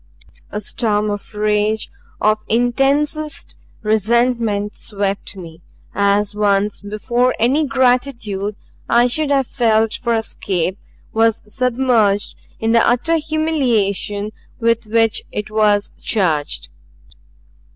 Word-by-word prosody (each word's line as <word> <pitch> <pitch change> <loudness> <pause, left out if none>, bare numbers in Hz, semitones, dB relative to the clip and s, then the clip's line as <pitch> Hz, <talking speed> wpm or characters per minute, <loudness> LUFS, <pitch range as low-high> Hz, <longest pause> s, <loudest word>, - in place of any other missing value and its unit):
A 210 - -4
storm 210 -1 0
of 205 +1 -7
rage, 210 +1 0 0.3
of 215 0 +2
intensest 275 +6 0 0.3
resentment 220 -1 +1
swept 200 -1 -3
me; 165 -3 -10 0.3
as 200 +1 +2
once 205 0 +1
before 235 +5 0
any 275 +7 +2
gratitude 245 -6 0 0.3
I 240 +1 +5
should 290 +4 0
have 275 -2 +2
felt 225 -3 +2
for 235 -2 -1
escape 190 -4 -2 0.3
was 225 0 +2
submerged 230 -3 +1 0.2
in 225 0 0
the 230 - +5
utter 250 +8 +2
humiliation 245 -10 0 0.3
with 230 -1 +1
which 225 0 +2
it 210 0 -4
was 210 -1 +2
charged. 160 -9 0
220 Hz, 105 wpm, -18 LUFS, 205-245 Hz, 0.3 s, I